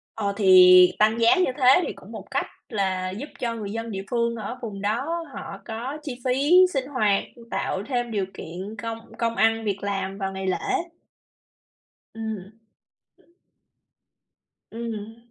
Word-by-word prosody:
Ờ 200 Hz, -2 st, -1 dB
thì, 185 Hz, -2 st, +8 dB
tăng 220 Hz, +2 st, +3 dB
giá 230 Hz, +9 st, +6 dB
như 365 Hz, -6 st, +2 dB
thế 265 Hz, +6 st, +6 dB
thì -, -, -3 dB
cũng -, -, -14 dB
một -, -, -7 dB
cách -, -, 0 dB, 0.2 s
là 190 Hz, -4 st, -1 dB
giúp 245 Hz, +11 st, -6 dB
cho 235 Hz, -2 st, -2 dB
người 210 Hz, -3 st, -5 dB
dân 225 Hz, +1 st, -4 dB
địa 195 Hz, -2 st, -4 dB
phương 235 Hz, -1 st, +1 dB
ở 220 Hz, +3 st, -6 dB
vùng 205 Hz, -4 st, -6 dB
đó 220 Hz, +8 st, -1 dB, 0.3 s
họ 195 Hz, -, -7 dB
có 245 Hz, +7 st, -5 dB
chi 260 Hz, -5 st, -6 dB
phí 265 Hz, +4 st, +1 dB, 0.2 s
sinh 265 Hz, -1 st, 0 dB
hoạt, 215 Hz, -8 st, +1 dB, 0.3 s
tạo 190 Hz, -, -2 dB
thêm 245 Hz, -3 st, -1 dB
điều 200 Hz, -3 st, -1 dB
kiện 185 Hz, +6 st, -7 dB
công 225 Hz, 0 st, -4 dB, 0.2 s
công 230 Hz, -1 st, 0 dB
ăn 225 Hz, +2 st, +2 dB
việc 200 Hz, -2 st, -1 dB
làm 195 Hz, -1 st, -3 dB
vào 195 Hz, -1 st, -3 dB
ngày 190 Hz, 0 st, -4 dB
lễ. 390 Hz, -, -1 dB, 1.4 s
Ừm. 220 Hz, -3 st, -6 dB, 2.2 s
Ừm. 225 Hz, -1 st, -6 dB
220 Hz, 155 wpm, -25 LUFS, 195-235 Hz, 2.2 s, thì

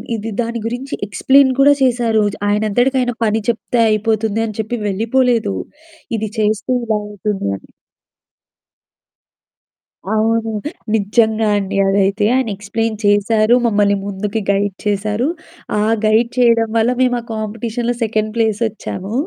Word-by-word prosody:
ఇది 220 Hz, +1 st, -5 dB
దాని 235 Hz, -1 st, -3 dB
గురించి 255 Hz, +4 st, -5 dB
ఎక్స్‌ప్లేన్ 265 Hz, +7 st, +4 dB
కూడా 285 Hz, +1 st, +7 dB
చేసారు. 235 Hz, -4 st, +2 dB, 0.3 s
ఆయనంతటికాయినా 245 Hz, +4 st, +1 dB
పని 220 Hz, +1 st, +1 dB
చెప్తే 235 Hz, +1 st, 0 dB
అయిపోతుంది 220 Hz, 0 st, 0 dB
అని 215 Hz, -, -7 dB
చెప్పి 240 Hz, +3 st, -4 dB
వెళ్ళిపోలేదు. 230 Hz, -, +1 dB, 0.6 s
ఇది 215 Hz, 0 st, -3 dB
చేస్తే 215 Hz, +4 st, 0 dB
ఇలా 220 Hz, -2 st, 0 dB
అవుతుంది 210 Hz, -, -3 dB
అని. -, -, -20 dB, 2.4 s
అవును. 225 Hz, +1 st, +1 dB, 0.4 s
నిజంగా 220 Hz, +1 st, +2 dB
అండి 200 Hz, 0 st, -3 dB
అదైతే, 200 Hz, +1 st, +2 dB
ఆయన 260 Hz, -2 st, +1 dB
ఎక్స్‌ప్లేన్ 215 Hz, +2 st, -2 dB
చేశారు, 215 Hz, +3 st, +3 dB
మమ్మల్ని 205 Hz, -2 st, +2 dB
ముందుకు 205 Hz, +2 st, -3 dB
గైడ్ 200 Hz, -1 st, +1 dB
చేసారు, 210 Hz, +5 st, 0 dB, 0.5 s
ఆ -, -, +1 dB, 0.2 s
గైడ్ 225 Hz, +2 st, +3 dB
చేయడం 230 Hz, -2 st, +3 dB
వల్ల 225 Hz, +2 st, +3 dB
మేము 245 Hz, -1 st, +2 dB
ఆ -, -, -17 dB
కాంపిటీషన్‌లో 230 Hz, +2 st, -3 dB
సెకండ్ 215 Hz, -1 st, -1 dB
ప్లేసొచ్చాము. 220 Hz, -3 st, -2 dB
220 Hz, 120 wpm, -17 LUFS, 210-235 Hz, 2.4 s, కూడా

